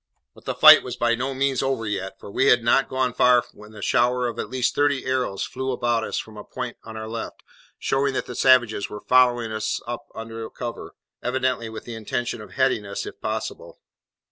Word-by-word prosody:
But - - -19
the - - -2
fight - - +9
was 125 -1 -6
by 120 -1 +1
no 130 +3 -2
means 135 -1 +1
over 135 -4 -1
yet, 95 -2 -4
for - - -10
we 130 - +2
had 120 -3 +5
not 125 +3 +3
gone 130 -2 0
far 125 -1 +4
when 105 +1 -14
a 105 - -8
shower 125 0 +2
of 120 - -5
at - - -4
least 130 -2 0
thirty 145 -2 +1
arrows 125 -7 -1
flew 130 0 -3
about 120 -2 0
us - - -3
from 110 -1 -6
a - - -8
point 125 -2 -6
on 110 -1 -9
our 110 0 -6
left, 115 0 -6 0.3
showing 135 0 0
that - - -1
the - - -7
savages 120 -6 +3
were 105 - -8
following 125 -3 +3
us 110 0 -2
up 120 0 -6
under 115 0 -7
cover, 120 -2 -7 0.3
evidently 130 -2 -1
with 110 - -8
the 120 - -8
intention 115 +1 -3
of 105 -3 -12
heading 130 -5 +1
us, 100 -1 -5
if - - -10
possible. - - -5
120 Hz, 215 wpm, -24 LUFS, 110-130 Hz, 0.3 s, fight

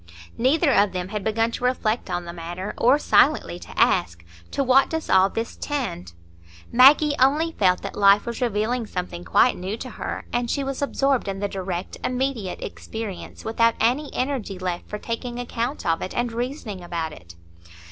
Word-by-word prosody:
Neither 280 +5 +3
of 200 -1 +3
them 180 0 -3
had 210 -1 -4
begun 225 +2 +1
to 245 - -6
reflect 245 -4 0
on 175 -1 -2
the 170 - -7
matter, 175 +4 -6
or 255 +4 +4
silently 295 - +3
to - - -8
ask, 85 -1 +2 0.2
"To 275 - -1
what 265 +1 +4
does 320 -1 -3
all 190 +1 +5
this 225 +3 -4
tend?" 240 - -4 0.6
Maggie 285 +4 +7
only 295 +6 +3
felt 185 - +2
that - - -5
life 200 0 +5
was 235 0 -5
revealing 230 +1 0
something 180 -2 -5
quite 230 +7 +3
new 190 +4 -4
to 255 - -7
her; - - -5
and 240 0 0
she 280 - 0
was 275 0 -4
absorbed 275 -3 +1
in 195 -1 -3
the 205 +1 -1
direct, 185 -2 -5
immediate 255 -7 -2
experience, 220 -5 -7
without 230 +1 +2
any 265 +6 +1
energy 255 -7 -2
left 180 -1 -4
for 210 - -4
taking 240 +2 -5
account 245 +2 -3
of 165 0 +1
it 185 - -5
and 240 -1 0
reasoning 235 - -4
about 165 -2 -4
it. 85 - -14
225 Hz, 180 wpm, -23 LUFS, 185-255 Hz, 0.6 s, Maggie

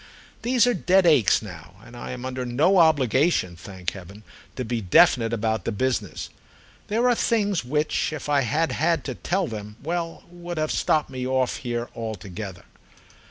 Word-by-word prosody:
These 245 +1 +3
are 245 - +3
dead 185 -1 +3
aches 140 - +4
now, 90 -3 -11
and 120 - -13
I 120 - -7
am 125 0 -6
under 130 0 -3
no 150 +11 +3
obligation, 140 - +3
thank 90 0 -6
heaven, 100 +3 -11 0.3
to 130 - -3
be 115 0 -2
definite 115 +4 +4
about 110 -1 -1
the - - -2
business. 105 -6 -2 0.6
There 230 +4 +1
are 245 - +5
things 205 - +1
which 150 +6 0
if 155 - -6
I 145 -1 +3
had 150 +6 0
had 165 +2 +1
to 130 - -4
tell 185 +9 -1
them—well, 140 +10 -5
would 175 0 -8
have 155 0 0
stopped 155 -3 +1
me 130 -1 -4
off 130 -1 0
here 120 -1 -3
altogether. 100 -4 -6
130 Hz, 165 wpm, -24 LUFS, 110-165 Hz, 0.6 s, are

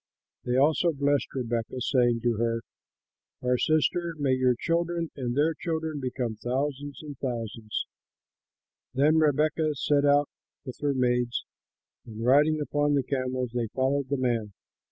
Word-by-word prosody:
They 125 +1 +1
also 160 +4 +3
blessed 145 0 +1
Rebekah, 120 -1 -3
saying 120 -2 +2
to 120 -2 +1
her, 115 0 0 0.8
"Our 125 0 +2
sister! 165 +4 +1
may 140 -3 +1
your 130 -1 +3
children 170 0 -1
and 125 -2 -3
their 155 +3 +3
children 160 -2 -3
become 125 -4 -3
thousands 140 +4 -3
and 145 -3 -9
thousands!" 115 -4 -3 1.1
Then 150 +4 +4
Rebekah 155 +1 +2
set 145 +1 +2
out 145 0 +4 0.4
with 130 - -8
her 145 -2 +1
maids 125 -1 0 0.6
and, 115 0 -7
riding 150 +4 +4
upon 145 0 +1
the 140 - +2
camels, 130 -2 -2
they 120 -2 -1
followed 135 +1 0
the 140 - 0
man. 115 -5 -1
135 Hz, 140 wpm, -27 LUFS, 125-150 Hz, 1.1 s, Then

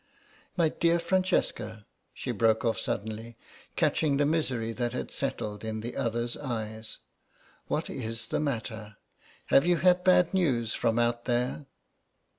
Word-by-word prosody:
My 165 -3 +4
dear 170 +2 +2
Francesca," 125 - 0 0.3
she - - -4
broke 110 0 +2
off 115 - +1
suddenly, 110 +2 -4 0.4
catching 145 -3 +2
the 145 - +3
misery 135 -7 0
that 120 0 -2
had - - -4
settled 105 0 -3
in 110 0 -3
the 120 +2 -6
other's 120 -2 -1
eyes, 110 -4 -5 0.7
"what - - -1
is 110 0 -3
the - - 0
matter? 110 -7 -3 0.6
Have 135 +5 +6
you 175 -1 +4
had 180 +3 +4
bad 180 -1 +5
news 130 - +1
from 115 -1 +1
out 120 0 +1
there?" 125 +3 -1
120 Hz, 140 wpm, -29 LUFS, 110-150 Hz, 0.7 s, Have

